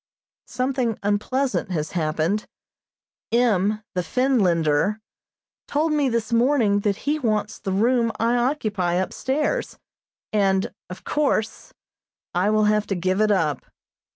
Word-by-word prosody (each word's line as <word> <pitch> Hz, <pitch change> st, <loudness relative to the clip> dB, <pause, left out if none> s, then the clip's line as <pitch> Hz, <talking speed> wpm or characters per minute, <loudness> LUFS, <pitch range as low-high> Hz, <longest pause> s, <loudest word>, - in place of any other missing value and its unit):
Something 255 Hz, -3 st, -1 dB
unpleasant 230 Hz, +5 st, 0 dB
has 155 Hz, -4 st, -2 dB
happened. 165 Hz, +5 st, -1 dB, 0.8 s
M., 215 Hz, -3 st, +2 dB
the 180 Hz, -, 0 dB
Finlander, 185 Hz, -, +1 dB, 0.7 s
told 305 Hz, +2 st, 0 dB
me 290 Hz, -3 st, +2 dB
this 230 Hz, -1 st, -2 dB
morning 230 Hz, -4 st, +3 dB
that 205 Hz, -1 st, 0 dB
he 300 Hz, +2 st, +1 dB
wants 215 Hz, -4 st, -1 dB
the 195 Hz, -, -4 dB
room 230 Hz, +4 st, +2 dB
I 230 Hz, +2 st, +2 dB
occupy 215 Hz, -9 st, 0 dB
upstairs, 275 Hz, -, -1 dB, 0.6 s
and, 195 Hz, -2 st, +1 dB, 0.2 s
of 180 Hz, -, -9 dB
course, 280 Hz, -7 st, -1 dB, 0.6 s
I 185 Hz, +3 st, +2 dB
will 215 Hz, 0 st, +3 dB
have 210 Hz, 0 st, +2 dB
to 195 Hz, -, -1 dB
give 185 Hz, +3 st, 0 dB
it 215 Hz, -, +3 dB
up. 165 Hz, -8 st, +1 dB
215 Hz, 125 wpm, -23 LUFS, 190-250 Hz, 0.8 s, morning